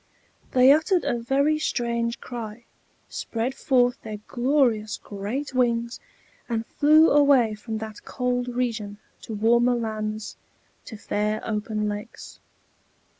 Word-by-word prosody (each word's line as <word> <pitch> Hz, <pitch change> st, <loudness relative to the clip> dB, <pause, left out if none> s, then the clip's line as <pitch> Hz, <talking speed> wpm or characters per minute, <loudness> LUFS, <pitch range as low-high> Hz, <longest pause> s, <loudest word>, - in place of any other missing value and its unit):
They 255 Hz, +1 st, +7 dB
uttered 320 Hz, +5 st, +3 dB
a 240 Hz, -, 0 dB
very 280 Hz, +6 st, +1 dB
strange 235 Hz, -4 st, -1 dB
cry, 235 Hz, -1 st, -7 dB, 0.4 s
spread 235 Hz, +3 st, -3 dB
forth 250 Hz, -2 st, +1 dB
their 215 Hz, -1 st, -6 dB
glorious 240 Hz, -5 st, +1 dB
great 215 Hz, +8 st, -5 dB
wings, 235 Hz, -1 st, 0 dB, 0.5 s
and 230 Hz, -1 st, -1 dB
flew 310 Hz, +5 st, +5 dB
away 280 Hz, -6 st, +5 dB
from 220 Hz, +1 st, -5 dB
that 220 Hz, -1 st, -8 dB
cold 250 Hz, -1 st, -2 dB
region 230 Hz, -4 st, -3 dB, 0.2 s
to 220 Hz, -, -6 dB
warmer 235 Hz, +3 st, +3 dB
lands, 215 Hz, -2 st, -4 dB, 0.5 s
to 220 Hz, -, -9 dB
fair 210 Hz, +1 st, -1 dB
open 215 Hz, -1 st, -2 dB
lakes. 210 Hz, +2 st, -7 dB
235 Hz, 120 wpm, -25 LUFS, 215-255 Hz, 0.5 s, They